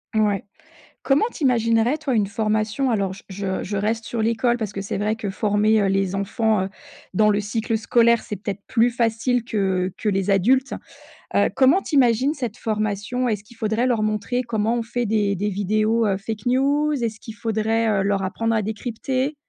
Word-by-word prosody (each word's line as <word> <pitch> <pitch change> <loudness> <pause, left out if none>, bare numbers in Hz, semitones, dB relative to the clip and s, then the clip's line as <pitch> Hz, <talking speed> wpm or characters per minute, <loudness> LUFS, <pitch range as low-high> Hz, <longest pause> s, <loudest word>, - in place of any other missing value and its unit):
Ouais. 210 -3 +2 0.6
Comment 280 +10 +3
tu 310 - -5
imaginerais, 230 +2 +2
toi, 285 -4 -2
une 210 -3 +2
formation 215 +5 0
alors 200 -4 0
je 195 - -11
je 190 -1 -3
je 205 +2 -4
reste 220 +3 -1
sur 230 -2 -2
l'école 230 +2 +1
parce 220 -4 -4
que 195 - -5
c'est 200 - -4
vrai 210 +2 0
que 220 -2 -4
former, 210 +2 +2
heu, - - +2
les 195 -1 0
enfants, 210 +1 0
heu, - - -4 0.4
dans 210 +3 +3
le 205 0 +2
cycle 220 +2 -2
scolaire 235 +1 +3
c'est 210 - -5
peut-être 200 0 -5
plus 235 -1 +3
facile 235 +1 0
que 190 -5 -1
que 215 - -2
les 195 0 0
adultes, 255 +8 +2 0.6
heu, - - +4
comment 275 +8 +5
tu 310 - -4
imagines 260 +2 +3
cette 245 -5 -4
formation? 215 +3 -2
Est-ce 210 -4 -1
qu'il 225 +2 -18
faudrait 220 +3 0
leur 235 -4 +1
montrer 215 +4 -1
comment 225 -1 0
on 235 - -1
fait 240 +1 -2
des 205 -2 +1
des 205 +3 -1
vidéos, 215 +3 +1
heu, 195 -2 +1
fake 215 +1 -6
news? 280 +4 +2
Est-ce 220 -1 -3
qu'il 225 - -9
faudrait, 225 +1 0
heu, 200 -2 +1
leur 200 0 +1
apprendre 225 +4 -1
à 220 - +2
décrypter? 250 +6 -3
220 Hz, 195 wpm, -22 LUFS, 205-235 Hz, 0.6 s, comment